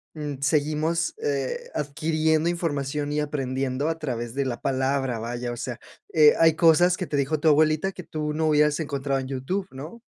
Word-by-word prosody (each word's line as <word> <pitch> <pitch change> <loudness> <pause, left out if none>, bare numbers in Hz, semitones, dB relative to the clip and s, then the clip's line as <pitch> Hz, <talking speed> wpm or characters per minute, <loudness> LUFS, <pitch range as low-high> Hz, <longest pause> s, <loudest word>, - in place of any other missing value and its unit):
mm, 145 -3 -5
seguimos, 155 +2 +1
eh, 485 +2 -2
adquiriendo 155 +2 0
información 145 -4 -2
y 150 - +1
aprendiendo 135 -1 -2
a 165 0 -2
través 120 -5 -4
de 140 - +1
la 125 -3 -3
palabra, 135 -2 0
vaya, 120 +1 -4
o - - -8
sea. 120 0 -5 0.3
Eh, 150 -2 +7
hay 160 -1 +5
cosas 175 +2 +5
que 185 - -4
te 145 - -3
dijo 140 +2 0
tu 160 - 0
abuelita 155 +5 +3
que 185 - -9
tú 150 -1 -4
no 160 +1 0
hubieras 150 -1 +3
encontrado 140 -2 -2
en 130 - -6
YouTube, 140 +9 -2
¿no? 155 - -9
150 Hz, 185 wpm, -25 LUFS, 135-160 Hz, 0.3 s, Eh